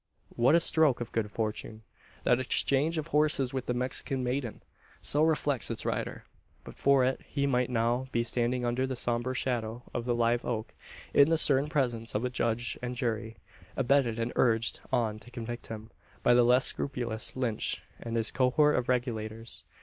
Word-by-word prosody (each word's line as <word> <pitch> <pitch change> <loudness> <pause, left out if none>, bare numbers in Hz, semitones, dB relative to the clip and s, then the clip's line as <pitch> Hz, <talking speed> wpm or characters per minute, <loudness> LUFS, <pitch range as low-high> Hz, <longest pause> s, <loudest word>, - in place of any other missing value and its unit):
What 125 +7 +4
a - - +6
stroke 160 -5 +3
of 120 - -5
good 110 -2 -1
fortune 110 0 -4 0.4
that 125 - +3
exchange 140 +5 +1
of 155 +1 -3
horses 150 -4 +2
with 130 -2 -3
the 125 - 0
Mexican 130 +1 -1
maiden! 125 -2 -3 0.4
So 145 - +1
reflects 150 -4 +1
its - - -4
rider. - - -3 0.4
But - - -11
for 135 -2 +4
it 130 - -1
he 140 -1 0
might 125 -2 +1
now 120 +2 0
be 115 - +1
standing 120 +1 0
under 125 +2 0
the 130 - -3
sombre 120 +1 -1
shadow 120 -2 -2
of 120 - -3
the 120 -1 +1
live 120 0 +1
oak, 110 -2 -3 0.4
in 140 +2 +6
the 165 - +3
stern 145 -1 +4
presence 120 -7 -1
of 110 +4 0
a 125 - -2
judge 120 -1 -1
and 125 0 -4
jury, 115 -2 -3 0.4
abetted 135 -3 +2
and 115 +1 -2
urged 115 -1 +2
on 115 -4 0
to 120 - -14
convict 120 0 -6
him, 110 0 -8 0.3
by 120 - +5
the 120 - +6
less 125 +2 +4
scrupulous 120 -5 -2
Lynch 120 -4 -2 0.2
and 115 0 -4
his 115 -2 +1
cohort 135 +4 +3
of 125 -1 -2
Regulators. 115 -3 -3
125 Hz, 180 wpm, -29 LUFS, 115-130 Hz, 0.4 s, a